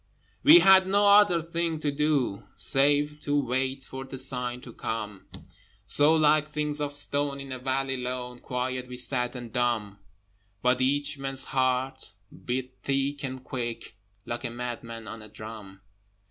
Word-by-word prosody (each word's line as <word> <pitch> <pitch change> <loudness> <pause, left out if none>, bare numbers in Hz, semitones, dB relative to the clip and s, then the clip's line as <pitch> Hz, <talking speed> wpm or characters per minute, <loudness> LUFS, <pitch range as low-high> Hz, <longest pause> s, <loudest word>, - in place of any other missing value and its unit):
We 325 +4 +9
had 190 -1 +7
no 205 +1 +3
other 200 -4 +6
thing 165 -1 -2
to 145 - 0
do, 140 -8 0
Save 145 +2 +2
to 145 -1 0
wait 130 +1 -1
for 130 0 -7
the 135 0 -8
sign 125 -2 -1
to 120 -3 -11
come: 105 -3 -5 0.6
So, 150 +2 +5
like 155 -1 +3
things 150 0 -2
of 145 0 -2
stone 145 -1 -1
in 135 -1 -8
a 130 - -5
valley 135 +1 -1
lone, 125 0 -5
Quiet 125 0 -3
we 125 0 -7
sat 125 0 +1
and 120 -3 -8
dumb: 110 -5 -1 0.6
But 125 +1 +2
each 140 +2 +1
man's 135 -1 -1
heart 130 -2 -1 0.3
beat 130 +1 -3
thick 140 +1 -1
and 130 -1 -5
quick 120 -4 -5 0.3
Like 120 +1 -5
a 120 - -2
madman 115 -1 -6
on 115 - -8
a 105 - -11
drum! 105 -2 -10
130 Hz, 160 wpm, -27 LUFS, 125-145 Hz, 0.6 s, We